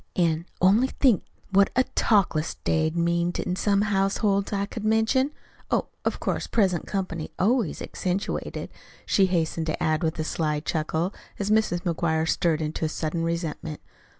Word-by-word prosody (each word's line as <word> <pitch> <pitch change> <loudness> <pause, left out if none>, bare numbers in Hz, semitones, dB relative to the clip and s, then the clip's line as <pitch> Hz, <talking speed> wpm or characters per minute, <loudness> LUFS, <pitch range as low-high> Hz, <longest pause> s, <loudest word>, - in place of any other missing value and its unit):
An' 170 -1 +1
only 205 +8 +5
think 255 -7 +2 0.3
what 195 0 +5
a 255 - +5
talkless 180 -7 +2
day'd 160 0 +1
mean 170 +1 +1
in 180 - -1
some 200 +1 +2
households 200 0 +1
I 200 -1 0
could 220 +1 -7
mention. 225 +5 +2 0.4
Oh, - - 0
of - - -1
course, - - -2
present 190 -6 +1
comp'ny 185 -5 -3
always 220 - +1
accentuated," 185 +1 -3 0.3
she 195 -2 +3
hastened 165 -2 0
to 155 - -2
add 155 +1 +1
with 160 -2 -1
a 155 - -1
sly 155 -1 -1
chuckle, 160 +4 -1 0.2
as 205 +1 -1
Mrs. 215 -5 +2
McGuire 165 -2 0
stirred 160 -1 +1
into 155 +1 -2
sudden 160 +1 -2
resentment. 165 -2 -3
175 Hz, 150 wpm, -26 LUFS, 160-200 Hz, 0.4 s, only